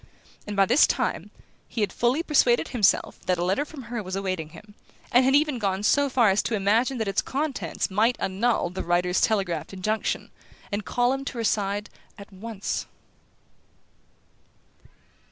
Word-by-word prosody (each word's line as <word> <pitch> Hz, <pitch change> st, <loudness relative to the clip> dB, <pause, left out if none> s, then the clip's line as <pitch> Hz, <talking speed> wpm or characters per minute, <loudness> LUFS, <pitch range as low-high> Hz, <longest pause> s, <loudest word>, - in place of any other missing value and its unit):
And 205 Hz, -, -4 dB
by 195 Hz, -1 st, +5 dB
this 250 Hz, +9 st, +5 dB
time -, -, -1 dB, 0.4 s
he 230 Hz, -, -4 dB
had 205 Hz, -, 0 dB
fully 250 Hz, +7 st, +1 dB
persuaded 255 Hz, -7 st, +3 dB
himself 225 Hz, -7 st, +1 dB
that 180 Hz, -1 st, +2 dB
a 170 Hz, -, -1 dB
letter 190 Hz, +10 st, +1 dB
from 295 Hz, -3 st, -10 dB
her 235 Hz, -1 st, -4 dB
was 185 Hz, -1 st, -5 dB
awaiting 185 Hz, -5 st, -3 dB
him, 205 Hz, +6 st, -14 dB, 0.4 s
and 250 Hz, +2 st, +5 dB
had 265 Hz, +2 st, +4 dB
even 295 Hz, -3 st, +2 dB
gone 195 Hz, -2 st, -1 dB
so 285 Hz, +6 st, +3 dB
far 240 Hz, -6 st, +4 dB
as 195 Hz, -, +2 dB
to 230 Hz, -, -2 dB
imagine 220 Hz, +6 st, +1 dB
that 220 Hz, -3 st, -2 dB
its 195 Hz, -, +1 dB
contents 275 Hz, -6 st, -3 dB
might 225 Hz, +5 st, +2 dB
annul 195 Hz, -1 st, 0 dB
the 185 Hz, -, -4 dB
writer's 180 Hz, +1 st, +1 dB
telegraphed 190 Hz, -6 st, 0 dB
injunction, 215 Hz, +3 st, -2 dB, 0.4 s
and 205 Hz, 0 st, -3 dB
call 245 Hz, +1 st, +1 dB
him 270 Hz, 0 st, -3 dB
to 260 Hz, -, -5 dB
her 230 Hz, -, -2 dB
side 205 Hz, -1 st, -1 dB, 0.3 s
at 200 Hz, 0 st, -12 dB
once... 210 Hz, +1 st, -4 dB
210 Hz, 170 wpm, -25 LUFS, 195-245 Hz, 0.4 s, by